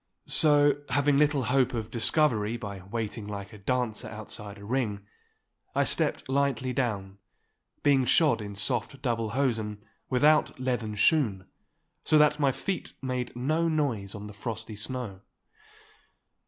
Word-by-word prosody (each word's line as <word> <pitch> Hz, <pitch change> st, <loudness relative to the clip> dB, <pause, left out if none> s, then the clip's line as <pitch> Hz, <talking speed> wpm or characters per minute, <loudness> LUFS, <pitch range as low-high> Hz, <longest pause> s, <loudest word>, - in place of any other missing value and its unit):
So, 145 Hz, -2 st, +4 dB
having 145 Hz, +1 st, +3 dB
little 145 Hz, -2 st, +3 dB
hope 130 Hz, 0 st, +2 dB
of 110 Hz, -1 st, -4 dB
discovery 115 Hz, -3 st, +1 dB
by 100 Hz, -3 st, -6 dB
waiting 105 Hz, +2 st, -4 dB
like 100 Hz, 0 st, -7 dB
a 105 Hz, -, -11 dB
dancer 120 Hz, 0 st, -1 dB
outside 105 Hz, -1 st, -6 dB
a 100 Hz, -, -11 dB
ring, 105 Hz, -4 st, -2 dB, 0.7 s
I -, -, +3 dB
stepped -, -, +2 dB
lightly 135 Hz, -2 st, 0 dB
down, 100 Hz, -6 st, -2 dB, 0.6 s
being 140 Hz, -3 st, +4 dB
shod 135 Hz, -3 st, +3 dB
in 100 Hz, -1 st, -7 dB
soft 120 Hz, +5 st, -1 dB
double 115 Hz, -4 st, 0 dB
hosen 110 Hz, -6 st, -1 dB, 0.2 s
without 150 Hz, +2 st, +3 dB
leathern 120 Hz, -4 st, -2 dB
shoon, 105 Hz, -, +2 dB, 0.6 s
so 155 Hz, -, +4 dB
that 150 Hz, 0 st, +4 dB
my 140 Hz, -2 st, +3 dB
feet 190 Hz, +8 st, -4 dB
made 125 Hz, -2 st, -3 dB
no 155 Hz, +7 st, +1 dB
noise 125 Hz, -11 st, -1 dB
on 105 Hz, 0 st, -7 dB
the 105 Hz, -, -9 dB
frosty 110 Hz, 0 st, -5 dB
snow. 105 Hz, -3 st, -5 dB
120 Hz, 140 wpm, -28 LUFS, 105-140 Hz, 0.7 s, So